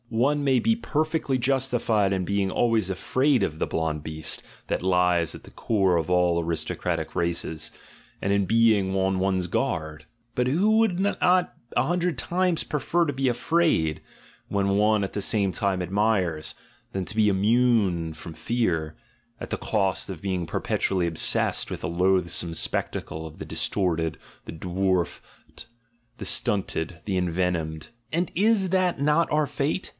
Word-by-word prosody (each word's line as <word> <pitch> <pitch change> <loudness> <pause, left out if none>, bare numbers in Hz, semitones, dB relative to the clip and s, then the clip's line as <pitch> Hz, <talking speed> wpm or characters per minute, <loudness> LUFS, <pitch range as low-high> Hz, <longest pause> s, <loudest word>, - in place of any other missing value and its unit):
One 140 +6 +1
may 135 -2 +3
be 225 - +2
perfectly 155 - -1
justified 120 -5 +1
in 95 -2 0
being 100 0 0
always 115 -4 +1
afraid 130 +5 +1
of 80 -4 -2
the - - +1
blonde 80 -2 -2
beast 80 0 -2 0.2
that - - -1
lies 90 -2 +2
at - - -12
the - - -14
core 95 -5 +1
of 80 -1 -1
all 90 -1 +2
aristocratic 80 0 -2
races, 85 -2 -2 0.5
and 100 - +1
in 100 -1 +2
being 110 -3 +3
on 95 0 +1
one's 95 -1 0
guard: 80 -2 -2 0.3
but 125 0 +1
who 200 +11 +3
would 205 -6 +2
not 200 +1 0 0.6
a - - +4
hundred 175 -3 0
times 180 +4 0
prefer 170 +3 0
to 145 - -2
be 130 0 +1
afraid, 120 - +1 0.5
when 100 -1 +1
one 105 +1 +3
at 95 - -8
the 100 - -2
same 100 -1 +1
time 95 -2 0
admires, 95 -5 0 0.4
than 95 -1 -3
to 110 - -7
be 110 -1 +4
immune 100 -5 +2
from 80 +1 -9
fear, 80 -4 -1 0.4
at - - -7
the - - -1
cost 100 -3 -1
of 90 -5 -6
being 95 -3 -2
perpetually 90 +2 0
obsessed 80 -1 0
with - - -5
the - - -2
loath 90 +1 +2
some 85 0 -2
spectacle 80 -1 -2
of 80 -1 -10
the - - -7
distorted, 85 -5 -1 0.3
the - - -7
dwarfed, 90 +1 -3 0.5
the - - -6
stunted, 95 -4 0
the 100 - -1
envenomed? 85 -3 -1 0.2
And 170 +3 0
is 200 0 +3
that 185 -3 +1
not 150 +4 +2
our 150 0 +2
fate? 145 +5 -2
95 Hz, 160 wpm, -25 LUFS, 85-130 Hz, 0.6 s, a